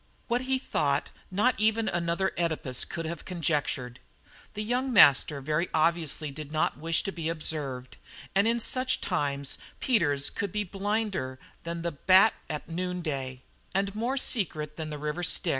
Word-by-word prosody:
What 240 +1 +1
he 260 0 +1
thought 260 - 0 0.2
not 210 +7 +3
even 220 +1 +2
another 175 +2 0
Oedipus 160 -7 0
could 165 - -5
have 170 +1 -5
conjectured. 145 -7 -2 0.6
The 210 - -2
young 250 +4 0
master 145 - +6
very 155 +5 0
obviously 160 -2 +1
did 150 +1 -8
not 155 -2 0
wish 165 +1 +1
to 195 - -2
be 165 -3 -3
observed, 145 -6 -3 0.4
and 200 +3 +4
in 235 +1 +2
such 255 +2 0
times 140 -6 -2 0.2
Peters 145 - +2
at - - -18
could 200 -2 -2
be 210 +1 0
blinder 195 -8 -2 0.3
than 170 0 -4
the 170 - -1
bat 185 +8 +5 0.3
noon 180 +1 -3
day 130 -4 -4 0.3
and 195 0 +1
more 235 +6 -1
secret 155 - -1
than 160 -1 -5
the 150 - -5
River 150 +3 -3
Styx. 175 0 +1
170 Hz, 160 wpm, -28 LUFS, 150-205 Hz, 0.6 s, master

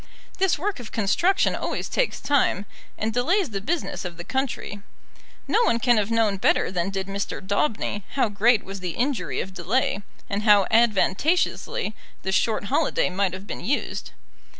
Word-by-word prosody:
This 385 -2 +3
work 385 +1 -2
of 240 - -9
construction 335 - +2
always - - -3
takes - - 0
time, 270 -8 +1 0.3
and 220 +1 -1
delays 335 - +1
the 195 -1 -3
business 320 - -2
of 175 -2 -6
the 170 - -6
country. 260 -4 -3 0.7
No - - +3
one 230 - +3
can 240 0 +3
have 210 0 +1
known 225 -3 +2
better 190 - +2
than 180 0 -1
did 195 -1 -3
Mr. 200 +1 -4
Daubeny 205 0 -1
how 270 -4 +2
great 215 +2 +3
was 195 0 -7
the 180 -2 -4
injury 245 -8 -1
of 190 - -7
delay, 200 +4 0 0.3
and 200 +1 -2
how 205 -3 +6
advantageously 225 - +2 0.3
the 190 - -1
short 220 +3 +1
holiday 200 - +1
might 190 0 0
have 190 +1 -7
been - - -6
used. 265 +10 -2
210 Hz, 170 wpm, -24 LUFS, 195-260 Hz, 0.7 s, how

